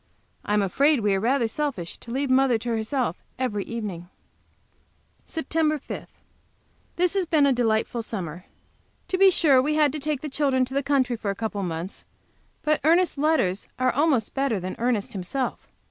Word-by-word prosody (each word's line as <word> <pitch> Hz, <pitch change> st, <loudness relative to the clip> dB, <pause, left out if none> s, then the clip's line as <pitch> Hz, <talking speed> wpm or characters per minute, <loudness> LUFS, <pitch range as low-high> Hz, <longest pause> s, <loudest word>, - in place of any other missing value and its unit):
I 210 Hz, -, 0 dB
am 210 Hz, -, +3 dB
afraid 275 Hz, -, +2 dB
we 205 Hz, -1 st, +2 dB
are 195 Hz, -, +1 dB
rather 240 Hz, +3 st, +2 dB
selfish 225 Hz, -, -3 dB
to -, -, -12 dB
leave 265 Hz, +2 st, -1 dB
mother 260 Hz, -2 st, +4 dB
to 235 Hz, +2 st, -5 dB
herself 225 Hz, -, -1 dB, 0.2 s
every 230 Hz, -6 st, -1 dB
evening. 200 Hz, -7 st, -5 dB, 1.2 s
SEPT. 320 Hz, -1 st, -5 dB, 0.3 s
5. -, -, -7 dB, 0.9 s
This 360 Hz, 0 st, +2 dB
has 385 Hz, -3 st, 0 dB
been 310 Hz, -3 st, +4 dB
a 275 Hz, -, +4 dB
delightful 230 Hz, -1 st, 0 dB
summer. 180 Hz, -6 st, -6 dB, 0.6 s
To 370 Hz, -, 0 dB
be 390 Hz, 0 st, +8 dB
sure, 285 Hz, -7 st, +5 dB
we 300 Hz, +3 st, 0 dB
had 300 Hz, -2 st, +4 dB
to 305 Hz, -, -4 dB
take 295 Hz, -1 st, -2 dB
the 310 Hz, -, -4 dB
children 270 Hz, -3 st, +1 dB
to 260 Hz, -, -9 dB
the 275 Hz, -, +1 dB
country 265 Hz, -3 st, +1 dB
for 215 Hz, -2 st, -4 dB
a 200 Hz, -, -1 dB
couple 210 Hz, -1 st, -3 dB
of 185 Hz, -, -2 dB
months, 170 Hz, +3 st, -5 dB, 0.6 s
but 305 Hz, 0 st, +1 dB
Ernest's 335 Hz, 0 st, +3 dB
letters 280 Hz, -, +1 dB
are 255 Hz, 0 st, +2 dB
almost 275 Hz, -6 st, +1 dB
better 270 Hz, -6 st, 0 dB
than 185 Hz, +1 st, -5 dB
Ernest 235 Hz, -4 st, 0 dB
himself. 210 Hz, +8 st, -3 dB
255 Hz, 180 wpm, -25 LUFS, 210-290 Hz, 1.2 s, be